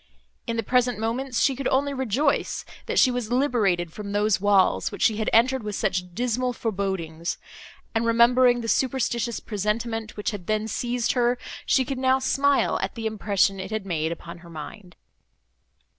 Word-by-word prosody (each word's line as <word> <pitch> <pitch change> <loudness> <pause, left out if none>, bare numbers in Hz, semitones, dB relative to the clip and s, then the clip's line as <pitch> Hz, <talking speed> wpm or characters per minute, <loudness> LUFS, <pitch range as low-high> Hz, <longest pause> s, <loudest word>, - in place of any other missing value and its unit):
In 230 -1 -2
the 230 - 0
present 250 +2 +2
moments, 235 +3 -2
she 270 - +3
could 270 0 -2
only 280 +2 +1
rejoice, 265 +2 0 0.2
that - - -2
she 255 - +6
was 245 -2 -3
liberated 210 - +1
from 200 -1 -6
those 205 -1 +2
walls, 195 - +3
which - - -4
she 215 - +3
had 220 - 0
entered 260 +3 +4
with 210 -2 -4
such 180 -2 -2
dismal 250 +1 0
forebodings; 190 -7 -3 0.6
and, 225 -1 +1
remembering 240 +1 +4
the 230 - -5
superstitious 235 -2 0
presentiment, 220 +1 -3
which 210 - -1
had 200 -5 -8
then 215 0 0
seized 240 +2 -1
her, 245 -1 +2 0.3
she 265 -1 +3
could 265 0 -4
now 260 0 +3
smile 275 +1 +2
at - - -3
the 225 -1 -5
impression 200 -2 +1
it 190 - -5
had 215 -2 -3
made 160 -3 -1
upon 170 +1 -8
her 170 0 -14
mind. 175 +4 -9
225 Hz, 175 wpm, -25 LUFS, 200-250 Hz, 0.6 s, she